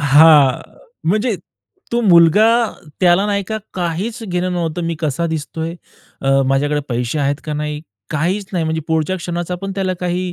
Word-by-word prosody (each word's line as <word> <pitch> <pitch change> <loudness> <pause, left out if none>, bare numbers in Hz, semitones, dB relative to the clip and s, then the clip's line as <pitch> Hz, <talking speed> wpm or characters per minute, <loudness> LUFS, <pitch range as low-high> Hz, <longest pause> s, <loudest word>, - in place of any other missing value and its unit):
हां, 145 -1 +7
अ, - - -8 0.4
म्हणजे 215 +3 +1 0.6
तो 240 - +2
मुलगा, 180 0 +6 0.5
त्याला 180 +2 +4
नाही 200 -1 0
का 220 0 -2 0.2
काहीच 190 +7 -3
घेणं 180 -1 -2
नव्हतं, 170 -1 -2
मी 165 0 -1
कसा 160 +1 -1
दिसतोय, 160 +1 -4 0.5
अ, 135 0 +2
माझ्याकडे 145 +2 +1
पैसे 125 +4 -2
आहेत 140 0 +1
का 155 - -4
नाही, 150 0 -3 0.3
काहीच 180 +7 -1
नाही 175 -3 0
म्हणजे 160 0 -1
पुढच्या 160 +3 0
क्षणाचा 175 0 -4
पण 195 0 -3
त्याला 190 -1 0
काही 180 0 -2
170 Hz, 165 wpm, -18 LUFS, 150-185 Hz, 0.6 s, हां